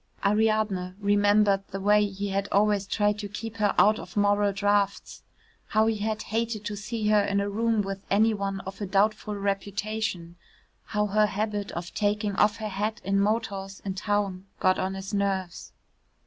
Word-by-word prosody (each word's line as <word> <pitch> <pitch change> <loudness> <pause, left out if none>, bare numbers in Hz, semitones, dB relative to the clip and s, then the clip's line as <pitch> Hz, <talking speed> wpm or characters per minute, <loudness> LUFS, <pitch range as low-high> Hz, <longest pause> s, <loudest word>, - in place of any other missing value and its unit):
Ariadne 210 -3 +1
remembered 205 -1 +3
the 195 - -6
way 210 +2 +4
he 200 0 -4
had 195 +1 -1
always 205 -1 +2
tried 210 0 +1
to 205 -1 -5
keep 225 +2 -7
her 210 -2 +1
out 215 +1 +5
of - - -10
moral 205 0 +3
draughts, 200 0 0 0.5
how 215 0 +3
he 225 -1 +1
had 215 +1 -2
hated 225 -1 -2
to 205 - -3
see 210 +1 -3
her 210 -1 +5
in 200 0 0
a 200 - 0
room 220 +1 +1
with 195 0 -5
any 220 +3 +4
one 195 -1 -3
of 190 +2 -9
a 205 - -2
doubtful 210 +2 +1
reputation, 200 -2 -3 0.5
how 210 -1 0
her 210 +1 +3
habit 205 0 -2
of 170 0 -6
taking 205 -1 0
off 210 0 +3
her 215 -1 -4
hat 210 +2 -2
in 195 +1 +1
motors 200 -2 -1
in 195 - -2
towns 200 -2 -1 0.2
got 185 0 +3
on 190 +1 -2
his 195 +2 -7
nerves. 195 -3 -2
205 Hz, 175 wpm, -27 LUFS, 195-215 Hz, 0.5 s, out